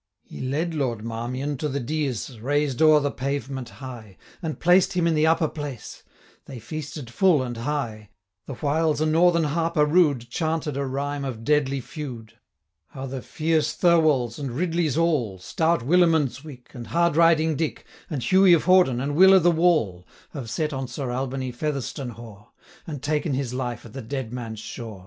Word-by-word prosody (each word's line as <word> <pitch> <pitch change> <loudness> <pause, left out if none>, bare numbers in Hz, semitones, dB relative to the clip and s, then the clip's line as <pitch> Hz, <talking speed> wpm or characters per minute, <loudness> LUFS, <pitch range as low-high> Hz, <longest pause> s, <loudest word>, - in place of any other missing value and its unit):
He - - -10
led 155 +6 -2
Lord 120 -7 -2
Marmion 125 +5 -3
to 150 +3 -2
the 140 +1 -2
deas, 140 -2 -2
195 115 -4 -13
Raised 145 -1 0
o'er 155 -1 +7
the 145 0 -1
pavement 135 -2 -4
high, 120 -8 -10 0.2
And 160 -3 -4
placed 180 +2 +4
him 180 -2 +1
in 165 - +3
the 155 0 +3
upper 160 0 +3
place 145 -6 -7 0.4
They 135 - -9
feasted 145 +1 -7
full 160 0 +3
and 120 -1 -5
high; 115 -5 -3 0.4
The 135 - -6
whiles 155 +3 0
a 155 - +1
Northern 170 +2 +3
harper 160 0 +1
rude 150 -7 +2
Chanted 155 +2 -2
a 140 0 -2
rhyme 140 +2 -3
of 120 -5 -5
deadly 140 -1 +1
feud, 125 -6 -8 0.6
200 - - -10
'How 135 - -4
the 135 -1 -5
fierce 160 +2 0
Thirwalls, 155 -9 +3
and 135 -4 -4
Ridleys 165 -2 0
all, 150 - +1
Stout 160 - 0
Willimondswick, 150 -4 +1
And 120 -2 -8
Hardriding 165 -1 +3
Dick, 155 +1 -3 0.2
And 140 -6 -3
Hughie 185 +6 +5
of 165 - +3
Hawdon, 180 -9 +4
and 140 +3 -2
Will 190 +3 +8
o' - - +7
the 175 0 +4
Wall, 155 - +1 0.3
Have 130 -6 -6
set 155 +5 -2
on 135 -1 -3
Sir 125 +1 -4
Albany 130 0 -3
Featherstonhaugh, 120 -6 -5 0.4
205 - - -34
And 145 -4 -6
taken 150 -1 0
his 130 -2 -3
life 125 -3 -4
at 110 - -12
the 135 - -6
Deadman's 120 -3 -5
shaw.' 110 -4 -8
140 Hz, 175 wpm, -24 LUFS, 125-160 Hz, 0.6 s, Will